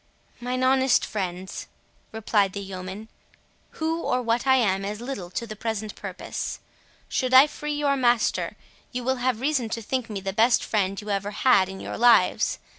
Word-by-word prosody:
"Mine 250 +1 -2
honest 265 0 +3
friends," 185 -3 -5 0.4
replied 210 -3 +1
the 200 - -4
yeoman, 190 +2 -7 0.7
"who, 325 +1 -1
or 250 - 0
what 235 +1 0
I 265 - +6
am, 195 -6 +2
is 205 +2 -4
little 235 -8 -6
to 235 - -4
the 215 -1 -8
present 215 -1 -4
purpose; - - -6 0.5
should 255 0 0
I 265 +2 +10
free 300 0 -5
your 290 -1 +1
master, 240 -3 +1 0.3
you 250 -1 -4
will 260 +1 0
have 245 -2 -1
reason 265 -5 0
to 230 +1 -3
think 255 +1 -2
me 205 -2 -4
the 195 0 -4
best 225 +4 +4
friend 195 -2 0
you 210 - -8
have 200 - +2
ever 205 - -5
had 200 -4 +3
in 190 0 -8
your - - -6
lives. 240 0 +4
230 Hz, 185 wpm, -25 LUFS, 200-255 Hz, 0.7 s, I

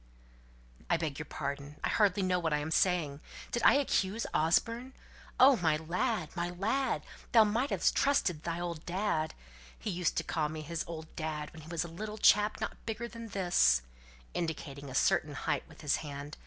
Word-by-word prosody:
"I 170 - +4
beg 155 -4 -3
your 150 - -6
pardon. 140 0 -5
I - - +1
hardly 200 -2 +3
know 180 -1 +2
what 165 -3 0
I'm 150 +2 -1
saying. 160 -6 +2 0.3
Did 240 - -1
I - - +7
accuse 225 -6 +1
Osborne? 230 +11 +1 0.5
Oh, 265 0 +8
my 160 -5 +2
lad, 160 0 -1
my 175 0 -1
lad 225 +9 0 0.3
thou 225 -2 +8
might 230 +6 +1
have - - +2
trusted 200 - +2
thy 170 0 -3
old 170 -2 -4
dad! 175 -4 -1 0.4
He 210 - -4
used 180 -1 0
to - - +1
call 155 -2 -1
me 155 0 -5
his 165 +1 -3
'old 160 -1 -8
dad' 155 -2 -4
when 160 - -10
he 155 - -13
was 170 -1 -1
a - - -6
little 210 +6 -6
chap 210 0 +4
not - - -5
bigger 225 +1 -3
than 230 -1 -8
this," 175 - +3 0.5
indicating 145 -4 -4
a 130 - -7
certain 145 +1 +2
height - - -2
with - - -14
his 150 -3 +1
hand. 145 0 -7
170 Hz, 185 wpm, -32 LUFS, 155-210 Hz, 0.5 s, Oh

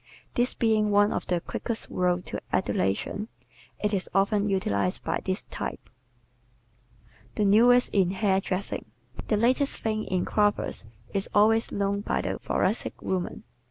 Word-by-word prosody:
This 245 +1 +1
being 215 -2 +2
one 205 0 +4
of - - -3
the 175 -1 +1
quickest 225 +5 -4
roads 180 0 0
to - - -4
adulation, 100 - -1 0.5
it 210 0 -1
is 190 -2 -1
often 200 +1 +2
utilized 100 - 0
by - - -1
this - - -1
type. - - -6 1.4
The 210 - +1
Newest 240 +5 +5
in 190 -3 +3
Hairdressing 190 -1 -1 0.4
¶ - - -19
The 215 - +2
latest 255 +6 +2
thing 215 -1 -1
in 185 -1 -1
coiffures 205 - +1 0.3
is 195 -1 -1
always 225 +2 +4
known 200 0 0
by 205 - -1
the - - -3
Thoracic - - -1
woman. 185 -2 -2
205 Hz, 145 wpm, -27 LUFS, 190-215 Hz, 1.4 s, Newest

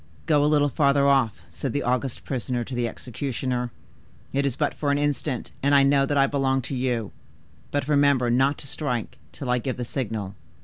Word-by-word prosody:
'Go 150 -3 +3
a - - +4
little 145 -1 +4
further 140 0 +3
off,' 135 -6 +2
said 135 - -4
the 145 - -1
august 125 +1 -1
prisoner 125 -1 -2
to 130 - -8
the 120 -1 0
executioner; 125 +1 -3 0.6
'it 140 +1 +2
is 130 - -2
but 150 0 0
for 145 - -2
an 140 - +3
instant, 145 -3 -1
and 140 +1 +3
I 140 - +7
know 140 0 +4
that 145 - 0
I 135 - +6
belong 135 -2 +1
to 135 - -4
you; 125 -4 -1 0.6
but 145 -1 -1
remember 140 -4 +3
not 135 +4 +3
to 135 - -10
strike 125 -5 -3
till 130 -3 -4
I 125 - +2
give 130 +2 -3
the 125 - -3
signal. 110 -6 -3
135 Hz, 205 wpm, -25 LUFS, 125-140 Hz, 0.6 s, I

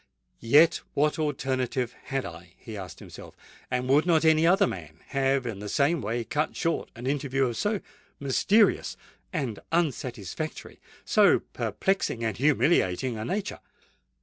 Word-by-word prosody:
"Yet 145 +8 +5
what 150 +2 +1
alternative 130 -4 -1
had 135 -2 -2
I?" 85 +1 -10
he 110 - -9
asked 95 -4 -8
himself; - - -12 0.3
"and 125 0 -1
would 145 +6 +3
not 165 -2 +3
any 160 +1 +5
other 195 +3 +5
man 80 - -7
have 135 -1 +1
in 110 -5 -4
the 105 0 -6
same 145 +6 +2
way 115 +3 -2
cut 150 +6 -2
short 165 0 -1
an 120 - -8
interview 135 -1 0
of 120 -2 -2
so 205 - -1 0.4
mysterious 195 - +2 0.3
and 135 - -3
unsatisfactory—so 150 - 0
perplexing 190 - -1
and 110 -1 -1
humiliating 130 - +2
a - - -3
nature?" 195 - -3
135 Hz, 140 wpm, -27 LUFS, 115-155 Hz, 0.4 s, Yet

